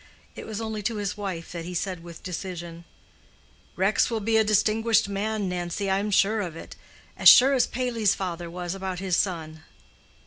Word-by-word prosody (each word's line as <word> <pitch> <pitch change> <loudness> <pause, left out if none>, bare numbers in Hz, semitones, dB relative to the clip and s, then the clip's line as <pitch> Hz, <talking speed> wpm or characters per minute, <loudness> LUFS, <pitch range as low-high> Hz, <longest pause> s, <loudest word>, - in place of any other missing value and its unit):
It - - -8
was 220 -1 -5
only 220 -1 -4
to 225 +2 -2
his 205 -1 -3
wife 190 -5 -5
that 170 -1 -6
he 180 +1 -7
said 180 0 -3
with 170 -1 -11
decision: 175 -2 -6 0.9
"Rex 195 +3 +2
will 230 -2 -1
be 220 +2 0
a 220 - +5
distinguished 215 +1 +2
man, 205 +1 -2
Nancy, 180 +2 -3
I 190 - +2
am 210 +1 -2
sure 210 +2 +2
of 175 -5 -5
it—as - - +1
sure 265 +3 +8
as 260 - +3
Paley's 235 -5 0
father 175 -2 -5
was 175 0 -5
about 190 -1 -4
his 185 -1 -1
son." 160 -5 -2
195 Hz, 180 wpm, -25 LUFS, 175-215 Hz, 0.9 s, sure